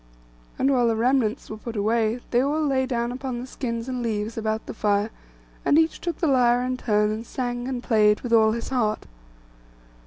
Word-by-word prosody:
And 270 - +2
when 245 -2 +3
the 225 - +2
remnants 240 0 +1
were 215 - -7
put 230 +1 -7
away, 220 +3 +1
they 245 - +3
all 300 +3 0
lay 260 -2 +1
down 240 -2 -1
upon 255 -1 -4
the 245 - -6
skins 235 -3 -4
and 255 -1 -3
leaves 220 -1 -2
about 220 -1 -2
the - - -6
fire, 210 0 0 0.5
and 290 - +4
each 320 0 +2
took 345 -3 -3
the - - -1
lyre 245 -4 +3
in 255 0 -1
turn, 210 -4 +1
and 220 +1 -4
sang 245 0 -4
and 250 -2 -4
played 210 -3 +3
with 240 -2 -3
all 220 -1 +5
his 235 - -4
heart. 230 -5 0
240 Hz, 205 wpm, -24 LUFS, 220-255 Hz, 0.5 s, all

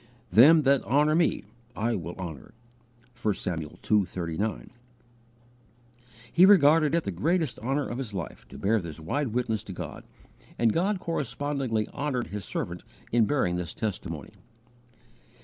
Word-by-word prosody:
"Them 150 +7 +7
that 140 -1 +4
honour 150 +4 +2
Me 165 +1 +2 0.3
I 115 +2 0
will 85 -4 -4
honour." 85 -7 -8 0.7
(1 105 - +2
Samuel 80 -4 -4
ii. 105 -2 +5
39.) 90 +5 -4 1.6
He 175 - +6
regarded 160 -5 +6
it 170 - +1
the - - -3
greatest 150 - 0
honour 135 +5 -1
of 120 - -5
his 125 -5 -4
life 95 -5 -6
to - - -11
bear 105 +2 +1
this 85 -2 -8
wide 140 - -1
witness 115 -2 -1
to 105 -3 -8
God, - - -7 0.5
and 115 -2 +3
God 190 +5 +1
correspondingly 135 - -2
honoured 135 -4 -3
His 105 -1 -5
servant 85 +1 -4 0.3
in 115 -1 +4
bearing 95 -10 +1
this 90 -1 -5
testimony. 105 -4 -4
115 Hz, 145 wpm, -27 LUFS, 95-145 Hz, 1.6 s, Them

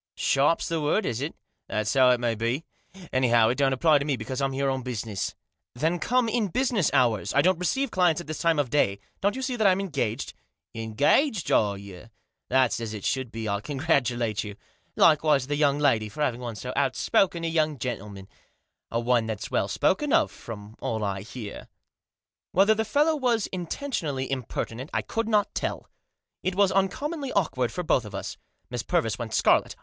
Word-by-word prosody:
" - - -69
Sharp's 140 +4 +2
the 165 -1 -1
word, 150 +9 +1
is 115 +1 -2
it? 150 +3 -4 0.3
That's 110 0 -1
how 130 -2 +6
it 125 -1 +3
may 120 -1 0
be. 115 +7 -1 0.5
Anyhow, 120 -3 +4
it 125 - -1
don!t 135 -1 +3
apply 155 +1 +4
to 140 - -3
me, 145 -3 0
because 120 +4 -5
Pm 135 -1 +1
here 135 +1 -1
on 130 -1 0
business.", 115 -5 -4 0.2
" - - -59
Then 160 +7 0
come 250 +3 +2
in 225 -1 0
business 235 - +1
hours. 120 -6 +2
I 140 - +5
don't 185 -1 +3
receive 265 +9 0
clients 175 -3 +3
at 175 - -7
this 155 0 -5
time 165 -2 +2
of 145 -4 0
day. 100 -9 +2 0.2
Don't 200 +1 +1
you 265 - -4
see 255 -1 -1
that 220 -3 0
Pm 185 0 +4
engaged? 140 - -2 0.2
" - - -63
"Engaged, 145 - +1
are 100 -2 +3
you? 100 +1 -11 0.4
That's 130 -2 +3
as 110 -2 -4
it 100 - -7
should 130 -3 -1
be. 115 -1 -5
I 100 0 -1
congratulate 125 -6 0
you. 105 -1 -7 0.4
Likewise 150 -4 +4
the 145 +2 -2
young 145 -1 +2
lady, 115 -8 +2
for 150 +8 -3
having 125 -4 -1
won 120 -2 -5
so 125 +4 -6
outspoken 165 - +1
a 165 - -2
youngf, 155 -2 +1
gentleman; 105 -6 -5 0.6
and 115 0 -2
one 120 -2 +2
that's 110 -3 -5
well - - +1
spoken - - +1
of, - - +3
from 105 -1 -10
all 110 -1 -2
I 100 -1 -2
beSr." 110 0 -8 0.9
Whether 200 +4 +5
the 220 +1 0
fellow 295 +8 +2
was 245 -7 +1
intentionally 170 - -3
impertinent 130 0 -4
I - - +1
could 225 0 -2
not 210 -2 +2
tell. - - -3 0.5
It 185 - -2
was 200 -1 +4
uncommonly 275 - -1
awkward 130 -10 0
for 180 - -4
both 130 -6 +2
of 105 -2 -9
us. 100 - -5 0.3
Miss 120 -2 -2
Purvis 110 0 0
went 115 -2 -4
scarlet. - - +3
135 Hz, 200 wpm, -26 LUFS, 115-175 Hz, 0.9 s, how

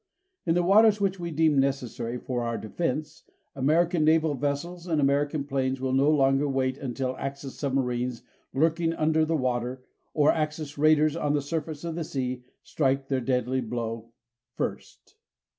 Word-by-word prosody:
In 165 - +3
the 175 - +2
waters 210 +3 +5
which 195 -2 0
we 170 -1 -4
deem 155 -2 +3
necessary 125 -3 -1
for 125 0 -3
our 115 -1 -2
defense, 150 +5 -3 0.3
American 160 +5 +2
naval 155 0 +3
vessels 145 +6 -3
and 160 -3 +1
American 145 +1 +1
planes 135 -2 -1
will 130 0 -1
no 135 +2 +4
longer 140 -1 +3
wait 130 -1 0
until 130 -1 -3
Axis 135 0 -5
submarines 125 -3 -2 0.3
lurking 165 +3 +1
under 155 0 +2
the 160 0 0
water, 125 -1 -2 0.3
or 150 -1 +5
Axis 155 -1 -3
raiders 155 +1 +4
on 150 -3 0
the 150 - +2
surface 155 0 -4
of 170 -1 -3
the 165 0 -3
sea, 130 -4 -3 0.2
strike 135 -2 0
their 135 -2 0
deadly 125 +1 0
blow 115 -1 -4 0.5
first. - - -6
140 Hz, 160 wpm, -27 LUFS, 130-160 Hz, 0.5 s, waters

